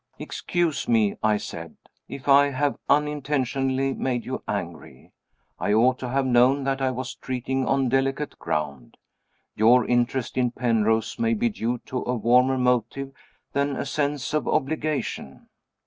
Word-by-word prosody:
"Excuse 175 Hz, -4 st, -2 dB
me," 110 Hz, -3 st, +2 dB
I 110 Hz, -1 st, +3 dB
said, -, -, -8 dB, 0.3 s
"if 140 Hz, -, -8 dB
I 140 Hz, +1 st, +6 dB
have 140 Hz, +1 st, -1 dB
unintentionally 135 Hz, -2 st, 0 dB
made 125 Hz, -3 st, -2 dB
you 130 Hz, -, -4 dB
angry. 85 Hz, -9 st, -6 dB, 0.5 s
I 105 Hz, -, 0 dB
ought 125 Hz, +4 st, +3 dB
to 125 Hz, -, -4 dB
have 135 Hz, +1 st, 0 dB
known 130 Hz, +2 st, +4 dB
that 135 Hz, 0 st, -1 dB
I 130 Hz, -, +2 dB
was 130 Hz, 0 st, -4 dB
treading 130 Hz, +1 st, -3 dB
on 135 Hz, -1 st, +2 dB
delicate 135 Hz, +3 st, -1 dB
ground. 70 Hz, -5 st, -4 dB, 0.6 s
Your 115 Hz, +3 st, +5 dB
interest 120 Hz, +1 st, 0 dB
in 125 Hz, -1 st, +2 dB
Penrose 115 Hz, -, 0 dB
may 230 Hz, 0 st, +2 dB
be 235 Hz, +2 st, +1 dB
due 125 Hz, -, -2 dB
to 130 Hz, -, -3 dB
a 125 Hz, -, -1 dB
warmer 125 Hz, +3 st, +3 dB
motive 125 Hz, +2 st, 0 dB, 0.4 s
than 140 Hz, 0 st, 0 dB
a -, -, -3 dB
sense 145 Hz, -1 st, -2 dB
of 155 Hz, -, 0 dB
obligation." 150 Hz, -, -2 dB
130 Hz, 145 wpm, -25 LUFS, 120-140 Hz, 0.6 s, I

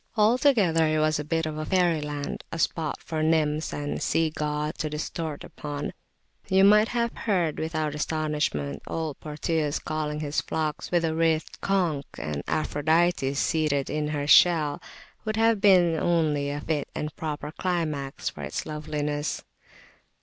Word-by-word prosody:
Altogether 210 Hz, -, +4 dB
it 155 Hz, 0 st, +1 dB
was 155 Hz, 0 st, +2 dB
a -, -, -2 dB
bit 165 Hz, +2 st, -1 dB
of 155 Hz, 0 st, -4 dB
fairyland, 150 Hz, -6 st, 0 dB
a -, -, -4 dB
spot 160 Hz, -2 st, -1 dB
for 160 Hz, -1 st, -3 dB
nymphs 155 Hz, -1 st, +1 dB
and 145 Hz, 0 st, -3 dB
sea 160 Hz, -1 st, +1 dB
gods 150 Hz, 0 st, -2 dB
to 155 Hz, -, -1 dB
disport 150 Hz, 0 st, -4 dB
upon: 145 Hz, -1 st, -5 dB, 0.6 s
you 190 Hz, 0 st, +5 dB
might 210 Hz, +2 st, +6 dB
have 235 Hz, -1 st, -1 dB
heard, 180 Hz, -8 st, 0 dB
without 155 Hz, -2 st, -2 dB
astonishment, 150 Hz, -, -1 dB
old 160 Hz, -3 st, -3 dB
Proteus 150 Hz, 0 st, -1 dB
calling 150 Hz, -1 st, -3 dB
his 150 Hz, -1 st, -1 dB
flocks 155 Hz, -2 st, -3 dB
with 175 Hz, -1 st, +2 dB
the 160 Hz, -1 st, +1 dB
writhed 160 Hz, -1 st, 0 dB
conch; 175 Hz, -8 st, +1 dB
and 75 Hz, -2 st, -3 dB
Aphrodite 155 Hz, -1 st, +1 dB
seated 145 Hz, -1 st, 0 dB
in 150 Hz, 0 st, -1 dB
her 145 Hz, -1 st, -2 dB
shell 155 Hz, -2 st, +5 dB, 0.4 s
would 215 Hz, 0 st, -2 dB
have 225 Hz, -2 st, +3 dB
been 180 Hz, -5 st, +5 dB
only 155 Hz, -4 st, +1 dB
a 145 Hz, +1 st, -3 dB
fit 150 Hz, -2 st, -2 dB
and 150 Hz, -1 st, -4 dB
proper 150 Hz, -1 st, -4 dB
climax 155 Hz, -6 st, -2 dB
for -, -, -4 dB
its -, -, -4 dB
loveliness. 150 Hz, -1 st, -3 dB
155 Hz, 150 wpm, -26 LUFS, 150-165 Hz, 0.6 s, might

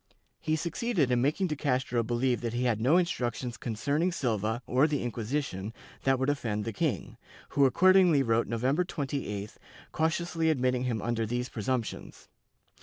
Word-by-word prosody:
He 155 Hz, -1 st, 0 dB
succeeded 170 Hz, -, 0 dB
in 120 Hz, -1 st, +3 dB
making 155 Hz, +8 st, +1 dB
de 155 Hz, -4 st, -1 dB
Castro 130 Hz, -4 st, 0 dB
believe 120 Hz, +2 st, 0 dB
that 115 Hz, -1 st, -3 dB
he 125 Hz, -, 0 dB
had 115 Hz, -4 st, +1 dB
no 140 Hz, +9 st, +4 dB
instructions 125 Hz, -, -1 dB
concerning 145 Hz, +11 st, -1 dB
Silva 110 Hz, -, -1 dB
or 130 Hz, +5 st, +3 dB
the 145 Hz, -4 st, -1 dB
Inquisition 115 Hz, -3 st, -3 dB, 0.3 s
that 135 Hz, 0 st, +4 dB
would 130 Hz, +1 st, -1 dB
offend 115 Hz, -8 st, -1 dB
the 115 Hz, -, -3 dB
king, -, -, -2 dB, 0.3 s
who 140 Hz, -, +3 dB
accordingly 180 Hz, 0 st, +5 dB
wrote 115 Hz, -1 st, +1 dB
November 130 Hz, +9 st, +1 dB
28th, 135 Hz, -, -4 dB, 0.3 s
cautiously 165 Hz, 0 st, 0 dB
admitting 130 Hz, -4 st, +1 dB
him 115 Hz, -4 st, -2 dB
under 115 Hz, -2 st, -1 dB
these 125 Hz, +2 st, -2 dB
pre 110 Hz, -, -6 dB
sumptions. 125 Hz, +1 st, -4 dB
130 Hz, 160 wpm, -29 LUFS, 115-150 Hz, 0.3 s, accordingly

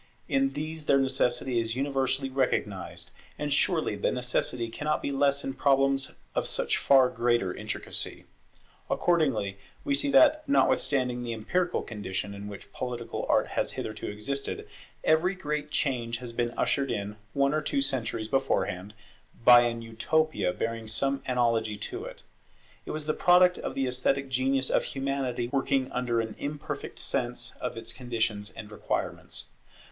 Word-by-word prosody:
In 275 Hz, 0 st, +2 dB
these 155 Hz, 0 st, -3 dB
their 140 Hz, -, +5 dB
necessity 130 Hz, -2 st, +1 dB
is 115 Hz, 0 st, -1 dB
universally 135 Hz, 0 st, 0 dB
recognized; 130 Hz, -1 st, -1 dB, 0.3 s
and 145 Hz, -1 st, -1 dB
surely 160 Hz, -, +1 dB
the 100 Hz, -, 0 dB
necessity 125 Hz, -1 st, 0 dB
cannot 150 Hz, +7 st, -1 dB
be -, -, -3 dB
less 140 Hz, 0 st, +2 dB
in 135 Hz, -, -3 dB
problems 135 Hz, 0 st, +2 dB, 0.2 s
of -, -, 0 dB
such -, -, 0 dB
far 135 Hz, -2 st, +6 dB
greater 120 Hz, -6 st, +1 dB
intricacy. -, -, -4 dB, 0.6 s
Accordingly 135 Hz, -, +1 dB, 0.2 s
we 285 Hz, -, 0 dB
see 285 Hz, 0 st, +1 dB
that, 305 Hz, +2 st, +6 dB
notwithstanding 130 Hz, -, +2 dB
the 120 Hz, -1 st, -3 dB
empirical 175 Hz, +12 st, 0 dB
condition 100 Hz, -2 st, -4 dB
in 100 Hz, 0 st, -7 dB
which 100 Hz, -1 st, -10 dB
political 120 Hz, -2 st, -4 dB
art -, -, +3 dB
has -, -, -1 dB
hitherto 110 Hz, 0 st, -5 dB
existed, 135 Hz, +7 st, -3 dB, 0.4 s
every 170 Hz, +5 st, +3 dB
great 150 Hz, -4 st, -3 dB
change 120 Hz, -6 st, 0 dB
has 120 Hz, -1 st, -7 dB
been 120 Hz, 0 st, 0 dB
ushered 140 Hz, -1 st, +1 dB
in, 105 Hz, 0 st, -3 dB, 0.2 s
one 140 Hz, 0 st, +2 dB
or 155 Hz, -, +1 dB
two 145 Hz, -, 0 dB
centuries 125 Hz, -5 st, -1 dB
beforehand, 105 Hz, -6 st, -1 dB, 0.5 s
by 120 Hz, -1 st, +10 dB
an 115 Hz, -1 st, -1 dB
Utopia 115 Hz, -, +1 dB
bearing 115 Hz, +3 st, -3 dB
some 135 Hz, +5 st, 0 dB
analogy 115 Hz, -4 st, +1 dB
to 100 Hz, -, -5 dB
it. -, -, -10 dB, 0.6 s
It -, -, -6 dB
was 155 Hz, -1 st, -2 dB
the 155 Hz, -, +1 dB
product 180 Hz, +2 st, +5 dB
of -, -, -4 dB
the 135 Hz, -, +1 dB
esthetic 130 Hz, +2 st, 0 dB
genius 130 Hz, +1 st, +1 dB
of -, -, +3 dB
Humanity 135 Hz, -3 st, -2 dB
working 135 Hz, -1 st, +1 dB
under 125 Hz, -2 st, 0 dB
an 110 Hz, -1 st, -5 dB
imperfect 145 Hz, +1 st, -5 dB
sense 120 Hz, +1 st, -2 dB
of 125 Hz, -, -3 dB
its 115 Hz, 0 st, -6 dB
conditions 115 Hz, -4 st, -1 dB
and 105 Hz, -1 st, -10 dB
requirements. 105 Hz, -, -3 dB
130 Hz, 150 wpm, -28 LUFS, 115-140 Hz, 0.6 s, by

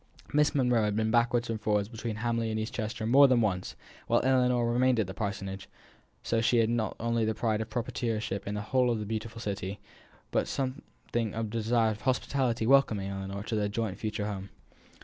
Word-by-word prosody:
Miss 150 Hz, 0 st, +3 dB
Monro 125 Hz, -4 st, +3 dB
had 105 Hz, -1 st, 0 dB
been 110 Hz, 0 st, +1 dB
backwards 120 Hz, 0 st, +2 dB
and 110 Hz, -1 st, -3 dB
forwards 105 Hz, -1 st, +1 dB
between 115 Hz, 0 st, -5 dB
Hamley 115 Hz, 0 st, -1 dB
and 110 Hz, 0 st, -1 dB
East 110 Hz, +4 st, -4 dB
Chester 110 Hz, -1 st, -3 dB
more 135 Hz, +5 st, +7 dB
than 130 Hz, -2 st, +4 dB
once, 95 Hz, -5 st, -1 dB, 0.3 s
while -, -, +4 dB
Ellinor 125 Hz, -2 st, +3 dB
remained 120 Hz, +1 st, +2 dB
at 110 Hz, -, +2 dB
the 95 Hz, -, -7 dB
parsonage; 100 Hz, -2 st, -4 dB, 0.5 s
so 115 Hz, -1 st, +1 dB
she 120 Hz, +1 st, +3 dB
had 115 Hz, 0 st, +3 dB
not 115 Hz, -2 st, -1 dB
only 115 Hz, 0 st, 0 dB
the 110 Hz, 0 st, 0 dB
pride 110 Hz, -1 st, 0 dB
of 110 Hz, -, -5 dB
proprietorship 110 Hz, -4 st, -2 dB
in 100 Hz, -, -2 dB
the 105 Hz, -, -2 dB
whole 125 Hz, +3 st, +2 dB
of 120 Hz, -, +1 dB
the 105 Hz, -, -4 dB
beautiful 110 Hz, +1 st, -4 dB
city, 100 Hz, -2 st, -4 dB, 0.5 s
but -, -, +1 dB
something 130 Hz, -4 st, -3 dB
of 110 Hz, -1 st, -3 dB
the 115 Hz, -, -2 dB
desire 115 Hz, 0 st, +2 dB
of 105 Hz, -, -7 dB
hospitably 130 Hz, -2 st, 0 dB
welcoming 110 Hz, -7 st, +3 dB
Ellinor 95 Hz, +1 st, -5 dB
to 110 Hz, -, -3 dB
their 105 Hz, -1 st, 0 dB
joint 105 Hz, -2 st, -3 dB
future 105 Hz, -1 st, -2 dB
home. 100 Hz, -2 st, -5 dB
110 Hz, 205 wpm, -29 LUFS, 105-120 Hz, 0.5 s, more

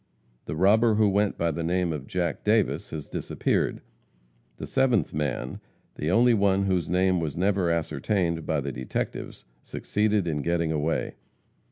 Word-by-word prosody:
The 75 Hz, -, -4 dB
robber 110 Hz, +6 st, +4 dB
who 105 Hz, 0 st, +4 dB
went 100 Hz, +1 st, +1 dB
by 85 Hz, 0 st, +1 dB
the 85 Hz, -, -4 dB
name 85 Hz, 0 st, 0 dB
of 70 Hz, -3 st, -6 dB
Jack 85 Hz, -4 st, -2 dB
Davis 105 Hz, -1 st, +1 dB
has 75 Hz, -2 st, -6 dB
disappeared. -, -, -1 dB, 0.8 s
The -, -, -6 dB
seventh 125 Hz, -, +1 dB
man 70 Hz, -4 st, -3 dB, 0.3 s
the 75 Hz, -, -3 dB
only 120 Hz, +5 st, +5 dB
one 100 Hz, -2 st, +2 dB
whose 90 Hz, -4 st, 0 dB
name 90 Hz, +1 st, +2 dB
was 80 Hz, -3 st, -3 dB
never 95 Hz, -1 st, +1 dB
ascertained 85 Hz, +1 st, -1 dB
by 80 Hz, -2 st, 0 dB
the 70 Hz, 0 st, -4 dB
detectives 65 Hz, 0 st, -5 dB, 0.2 s
succeeded 105 Hz, -3 st, -1 dB
in 75 Hz, -3 st, -1 dB
getting 85 Hz, 0 st, 0 dB
away. 80 Hz, +1 st, -1 dB
85 Hz, 155 wpm, -26 LUFS, 80-100 Hz, 0.8 s, only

